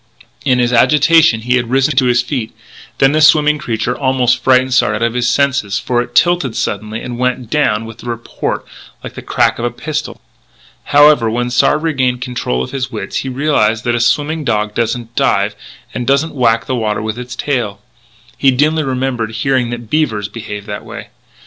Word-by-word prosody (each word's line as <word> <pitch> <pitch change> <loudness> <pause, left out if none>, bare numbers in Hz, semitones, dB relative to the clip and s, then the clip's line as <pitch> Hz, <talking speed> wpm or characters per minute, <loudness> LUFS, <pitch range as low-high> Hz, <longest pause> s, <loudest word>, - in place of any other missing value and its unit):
In 130 -3 +2
his 120 0 +1
agitation 150 0 +4
he 125 +2 +1
had 120 -2 -2
risen 135 +3 +1
to 130 - +4
his 120 0 +2
feet; 125 -4 -3
and 110 - -31 0.4
then 135 0 +4
the 155 +1 +1
swimming 150 -1 +5
creature 120 -2 -2
almost 130 -2 +1
frightened 130 0 +3
Sard 105 -4 +2
out 105 - -2
of 115 0 0
his 125 0 0
senses, 130 -7 +1
for 120 -1 0
it 120 0 -8
tilted 175 -9 +2
suddenly 110 +2 -3
and 120 -1 -6
went 125 -2 -2
down 115 -7 +1
with 115 +1 -11
a - - -10
report 115 -1 -4 0.4
like - - -8
the - - -8
crack - - +1
of 120 - -2
a - - +1
pistol. 150 +5 -5 0.7
However, 145 -5 +5
when 120 +2 -2
Sard 150 +5 +2
regained 130 -6 0
control 120 - -3
of - - -7
his 130 -1 -3
wits 105 -4 -5
he 135 - -3
realised 125 -5 +1
that 120 - 0
a 120 - 0
swimming 150 +6 0
dog 105 -4 -1
doesn't 115 +1 -3
dive - - +1 0.4
and 120 - -4
doesn't 140 +4 +1
whack 115 -4 +1
the 130 - -2
water 110 -3 -2
with 110 +2 -4
its 125 0 -7
tail. 115 -8 -2 0.6
He 135 - +4
dimly 150 +5 +2
remembered 130 -4 -2
hearing 125 +2 0
that 120 -2 -7
beavers 115 -10 0
behaved 105 -2 -8
that 105 -1 -6
way. - - -9
125 Hz, 195 wpm, -15 LUFS, 115-135 Hz, 0.7 s, swimming